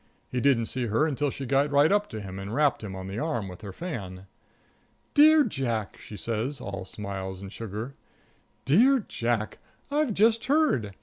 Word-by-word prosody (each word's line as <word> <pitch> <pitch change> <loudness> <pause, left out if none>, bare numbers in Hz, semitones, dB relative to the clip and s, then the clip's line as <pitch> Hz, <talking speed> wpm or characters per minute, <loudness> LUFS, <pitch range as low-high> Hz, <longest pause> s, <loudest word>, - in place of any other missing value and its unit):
He 125 - -1
didn't 130 -4 +3
see 125 +1 -3
her 115 +8 +2
until 145 -1 0
she 135 +1 -6
got 140 +3 +2
right 145 +3 +4
up 205 0 +2
to 110 - -6
him 95 -2 -7
and 100 +4 -5
rapped 145 -5 +2
him 95 -3 -6
on 95 0 -6
the 95 +3 -4
arm 120 -10 -2
with 90 +1 -10
her 100 -3 -7
fan. 95 - -6 0.9
"Dear 310 +1 +7
Jack," 120 - -2
she 105 - -10
says, 115 +7 -2
all 100 -1 -5
smiles 95 -1 -6
and 100 +1 -9
sugar; 115 +4 -6 0.7
"dear 230 - +4
Jack, 115 -2 -2 0.3
I've 290 -7 +1
just 225 +2 +3
heard. 265 - +2
120 Hz, 180 wpm, -27 LUFS, 100-155 Hz, 0.9 s, Dear